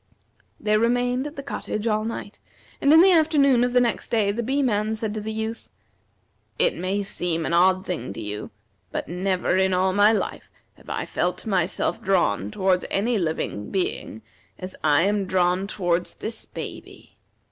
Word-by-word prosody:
They 215 -1 +2
remained 245 +3 +1
at 295 - -10
the 280 - -6
cottage 215 -5 -4
all 215 -1 +1
night, 220 -2 -6 0.4
and 280 - +4
in 320 +1 +8
the 380 +1 +7
afternoon 295 -7 +4
of 245 - +1
the 250 - +4
next 240 -1 0
day 215 -4 +2
the 225 +4 -2
Bee 270 +4 0
man 215 -2 0
said 220 -1 -3
to 215 - -4
the 220 +1 -4
Youth: 220 +1 -4 0.9
"It - - +2
may 195 +2 -1
seem 170 -4 -1
an - - -2
odd 185 +2 +4
thing 180 - -4
to - - -8
you, 105 -1 -5 0.4
but - - -4
never 185 +1 0
in 190 -1 +2
all 185 +1 +2
my 205 +2 +5
life 220 - -3 0.2
have - - -17
I - - -2
felt 180 +1 -2
myself 190 +2 0
drawn 175 - +1
towards 185 - +1
any 225 +3 +1
living 155 - -3
being 175 - -3 0.3
as 185 0 -7
I 150 +1 +4
am 200 0 +1
drawn 185 +1 +1
towards 175 -3 -1
this 225 +1 -6
baby. - - -9
205 Hz, 180 wpm, -24 LUFS, 180-230 Hz, 0.9 s, in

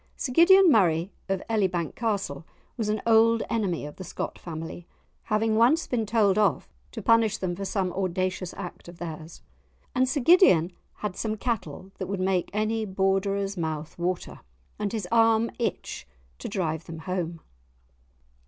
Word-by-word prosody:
Sir 255 - -3
Gideon 370 +3 +7
Murray, 175 - +3 0.2
of 195 -1 -1
Elibank 185 -7 0
Castle, 200 -11 -2 0.3
was 220 -4 -2
an 215 0 -1
old 230 0 +4
enemy 195 -9 -1
of 150 - -9
the 185 - -7
Scott - - -5
family, 165 +1 -7 0.4
having 215 0 +1
once 255 +9 +4
been 225 -4 -1
told 210 -2 +3
off 205 -2 +2 0.2
to - - -7
punish 230 -2 +4
them 180 -2 -3
for 195 +2 -5
some 190 -2 -1
audacious 185 -1 -2
act 180 -3 -8
of 175 0 -11
theirs. 160 -1 -8 0.5
And 255 0 +2
Sir 285 +1 0
Gideon 240 - +5 0.3
had 195 -3 -3
some 220 -1 -2
cattle 195 - -4
that - - -3
would 195 -1 -3
make 185 -1 0
any 215 +2 0
Borderer's 195 0 0
mouth 160 -2 -4
water 180 +1 -3 0.4
and 205 -1 -1
his 215 -5 -3
arm 225 0 +4
itch 230 - -3 0.3
to - - -5
drive 165 -5 -2
them 165 -1 -8
home. 175 -3 -3
195 Hz, 160 wpm, -26 LUFS, 175-225 Hz, 0.5 s, Gideon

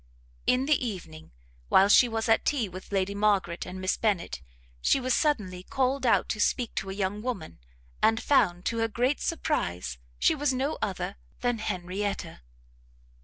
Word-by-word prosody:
In 250 +1 +3
the 295 -2 +2
evening, 165 -8 -6 0.4
while 195 - +6
she 240 +4 +6
was 225 0 -2
at 225 -1 +4
tea 265 -7 0
with 185 +2 -10
Lady 195 0 0
Margaret 200 -5 +1
and 185 +1 -7
Miss 185 0 0
Bennet, 195 - -1 0.4
she - - +3
was 255 -1 0
suddenly 210 - 0
called 260 +5 0
out - - +3
to 215 - -2
speak 235 +2 +1
to 195 - -2
a - - -3
young 200 +1 -2
woman; 195 - -5 0.4
and 225 0 +4
found, 180 -12 +2
to 230 - -1
her 225 - +2
great 250 +6 0
surprise, 90 - -2 0.2
she - - +4
was 290 -1 0
no 275 +4 -1
other 190 - -3 0.2
than 245 -2 0
Henrietta. 195 - -3
210 Hz, 170 wpm, -28 LUFS, 185-250 Hz, 0.4 s, while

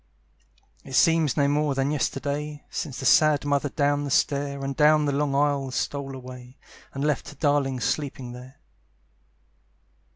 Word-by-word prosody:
It 135 - -11
seems 160 -2 +3
no 140 -1 +3
more 145 0 +1
than 135 +1 0
yesterday 145 +1 -3
Since 135 -5 -5
the - - -5
sad 150 +1 +4
mother 145 0 0
down 145 0 0
the 145 - -4
stair 140 0 0
And 135 0 -3
down 150 +1 +4
the 145 - +1
long 140 0 0
aisle 140 -1 +1
stole 135 +1 -3
away, 125 0 -11 0.3
And 140 +1 -3
left 150 -2 -1
her 145 - -12
darling 140 -3 +1
sleeping 130 0 -3
there. 125 +3 -12
140 Hz, 155 wpm, -25 LUFS, 135-145 Hz, 0.3 s, sad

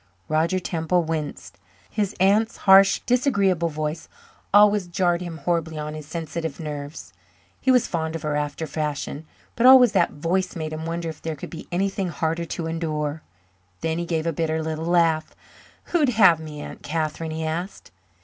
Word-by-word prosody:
Roger 165 +4 +1
Temple 175 0 0
winced. 150 - -5 0.3
His 205 -1 -2
aunt's 210 +4 +3
harsh, 195 0 +7
disagreeable 200 - +2
voice 155 +1 -4 0.4
always 205 -2 +5
jarred 175 0 +1
horribly 165 -1 -2
on 150 0 -4
his 155 -1 -8
sensitive 160 -1 -5
nerves. 150 -1 -7 0.5
He 260 - -1
was 250 -2 +5
fond 160 -1 -3
of 165 - -5
her 150 -1 -1
after 150 +2 -2
a - - -9
fashion, 150 0 -4 0.3
but 240 +2 +4
always 255 -3 +8
that - - +2
voice 180 +5 -1
made 155 -2 -4
him 160 +1 -5
wonder 170 0 -3
if 155 - -9
there 160 -1 -3
could 140 - -9
be 160 - -9
anything 195 +1 -1
harder 165 +2 -2
to 165 0 -4
endure. 155 -2 -3 0.6
Then 160 +1 -1
he 170 - -3
gave 160 -2 -1
a 165 - 0
bitter 160 0 -1
little 160 0 -3
laugh. 165 -2 +2 0.6
"Who'd 310 -6 +3
have 195 -8 +5
me, 155 -2 -8
Aunt - - -9
Catherine?" 160 +1 -3
he 160 0 -3
asked. 170 +5 -5
165 Hz, 170 wpm, -24 LUFS, 155-185 Hz, 0.6 s, always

